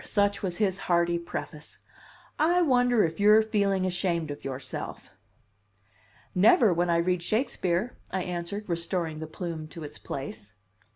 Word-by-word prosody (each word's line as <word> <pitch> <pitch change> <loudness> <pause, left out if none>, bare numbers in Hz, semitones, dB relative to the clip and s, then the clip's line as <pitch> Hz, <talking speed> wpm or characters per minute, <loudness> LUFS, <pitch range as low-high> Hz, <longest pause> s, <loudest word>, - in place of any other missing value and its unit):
such 200 -1 +1
was 180 -3 -3
his 195 -3 +1
hearty 170 0 +3
preface. 155 -2 -7 0.6
"I 350 +3 +4
wonder 245 -6 +4
if 160 +1 -2
you're 210 +2 +6
feeling 200 -3 +1
ashamed 175 -4 -1
of 145 - -8
yourself?" 130 -1 -6 1.2
"Never 205 +1 +5
when 175 +1 0
I 170 - +3
read 180 +1 +1
Shakespeare," 210 0 -1 0.2
I 190 -1 -1
answered 180 +4 -4
restoring 170 -2 -2
the 160 - -5
plume 160 -1 -5
to 160 +1 -9
its 145 - -9
place. 110 -6 -7
180 Hz, 140 wpm, -27 LUFS, 165-205 Hz, 1.2 s, you're